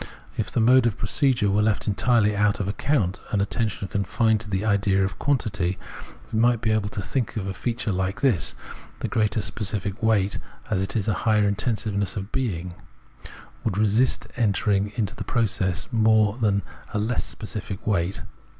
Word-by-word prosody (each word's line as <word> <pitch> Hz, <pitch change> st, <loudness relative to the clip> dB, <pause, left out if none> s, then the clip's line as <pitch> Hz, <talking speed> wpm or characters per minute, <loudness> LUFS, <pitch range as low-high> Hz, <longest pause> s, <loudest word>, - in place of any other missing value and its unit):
If -, -, -2 dB
the -, -, 0 dB
mode 120 Hz, +2 st, +5 dB
of 110 Hz, -, -2 dB
procedure 120 Hz, -2 st, +1 dB
were 105 Hz, +1 st, +3 dB
left 105 Hz, -1 st, +1 dB
entirely 105 Hz, 0 st, +3 dB
out 105 Hz, 0 st, +2 dB
of 100 Hz, -, -2 dB
account, 100 Hz, -2 st, 0 dB
and 105 Hz, -, 0 dB
attention 100 Hz, 0 st, -1 dB
confined 110 Hz, +3 st, +1 dB
to 110 Hz, -, -8 dB
the 95 Hz, +2 st, -1 dB
idea 100 Hz, -2 st, +2 dB
of 95 Hz, -, -5 dB
quantity, 105 Hz, -10 st, 0 dB, 0.6 s
we 110 Hz, -, +1 dB
might 120 Hz, 0 st, +4 dB
be 110 Hz, -1 st, 0 dB
able 110 Hz, -2 st, +1 dB
to 100 Hz, -1 st, -5 dB
think 125 Hz, +1 st, -2 dB
of 100 Hz, -, -2 dB
a 95 Hz, -, -3 dB
feature 115 Hz, +2 st, -2 dB
like 95 Hz, +3 st, -2 dB
this: 125 Hz, -, +2 dB, 0.2 s
— -, -, -21 dB
the -, -, -1 dB
greater 110 Hz, -1 st, +1 dB
specific 105 Hz, 0 st, -2 dB
weight, 105 Hz, -3 st, +2 dB, 0.3 s
as 95 Hz, -3 st, +1 dB
it 95 Hz, -, -2 dB
is 105 Hz, -2 st, 0 dB
a 110 Hz, -, +2 dB, 0.2 s
higher 105 Hz, -1 st, +4 dB
intensiveness 100 Hz, -2 st, -1 dB
of 100 Hz, +2 st, -5 dB
being 95 Hz, -10 st, -2 dB
[Insichseyn), -, -, -18 dB, 0.3 s
would 105 Hz, -4 st, -1 dB
resist 110 Hz, +4 st, +2 dB
entering 105 Hz, -2 st, +1 dB
into 105 Hz, -4 st, -2 dB
the -, -, -5 dB
process 95 Hz, -6 st, 0 dB
more 110 Hz, -2 st, +4 dB
than 100 Hz, -4 st, +2 dB, 0.3 s
a -, -, +2 dB
less 110 Hz, +4 st, 0 dB
specific 105 Hz, -2 st, -6 dB
weight. 100 Hz, -2 st, 0 dB
105 Hz, 180 wpm, -24 LUFS, 100-115 Hz, 0.6 s, mode